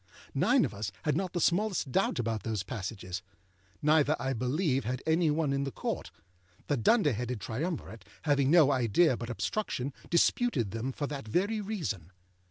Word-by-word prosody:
Nine - - +4
of - - -5
us 100 -1 -4
had 150 -3 +1
not 185 +1 -2
the 175 - 0
smallest 180 -5 +1
doubt - - +1
about 115 -3 -1
those 105 -1 -2
passages, 95 -4 -5 0.6
neither, 150 0 +4
I 135 +2 -1
believe, 135 - 0
had 125 +3 -3
any 160 0 +3
one 150 -2 +1
in 140 0 0
the 140 - -2
Court; - - -4 0.6
the 145 - +1
dunder 150 - +3
headed 120 +1 -3
triumvirate, 120 - -4 0.2
having 140 -3 +3
no 155 -3 +6
idea 130 +3 +3
but 115 0 -6
obstruction, 140 - -2 0.2
disputed 170 - +2
them 115 +5 -3
for 145 - -3
that 140 -5 -6
very 200 - 0
reason. 160 - -4
135 Hz, 170 wpm, -30 LUFS, 115-160 Hz, 0.6 s, no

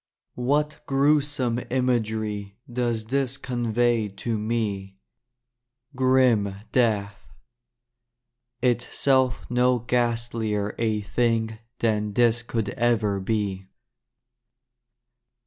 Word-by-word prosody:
What 150 +4 0
gruesome 140 -3 +2
imagery 110 -5 -1
Does 120 -2 -1
this 135 +2 -1
convey 120 -3 0
to 110 +2 -3
me. 105 -3 -2 1.0
Grim 130 -6 +3 0.2
death 105 -5 +1 0.8
— 120 0 -57
itself 130 +1 +2
no 125 +1 +3
ghastlier 115 -3 -1
a 110 -2 0
thing 110 +1 0 0.2
than 105 -3 0
this 120 +1 +3
Could 115 -3 -2
ever 110 -3 +1
be. 95 -2 -2
115 Hz, 80 wpm, -25 LUFS, 105-125 Hz, 1.0 s, Grim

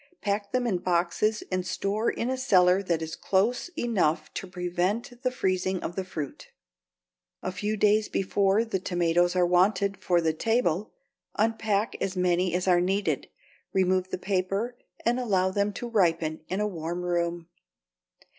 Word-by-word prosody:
Pack 200 0 -2
them 250 -1 0
in 195 -7 0
boxes 180 +5 +1
and 185 0 0
store 200 +4 -1
in 240 +3 -2
a - - 0
cellar 185 -8 +4
that 170 -4 -1
is 160 0 -5
close 225 - +1
enough 170 -9 0
to 190 - -5
prevent 185 +8 -2
the 255 - +1
freezing 190 -5 0
of 175 - -4
the 190 - -2
fruit. 155 -6 -6 1.0
A 185 - -2
few 210 +4 -2
days 210 +1 +3
before 195 +3 +2
the 210 -4 -2
tomatoes 175 0 +1
are 180 -1 +4
wanted 190 +2 +2
for 180 -2 +2
the 160 -1 +1
table 215 0 0 0.4
unpack 220 -1 +1
as 190 -1 -2
many 180 0 +2
as 180 +1 -1
are 175 -1 +5
needed, 195 +3 0 0.5
remove 185 -1 +2
the - - -3
paper, 195 +5 -1 0.3
and 240 +2 +2
allow 190 -6 +1
them 200 +1 0
to 240 - -5
ripen 165 -8 +1
in 190 - -2
a 210 - +1
warm 175 -1 -4
room. 170 -1 -1
185 Hz, 160 wpm, -27 LUFS, 175-210 Hz, 1.0 s, are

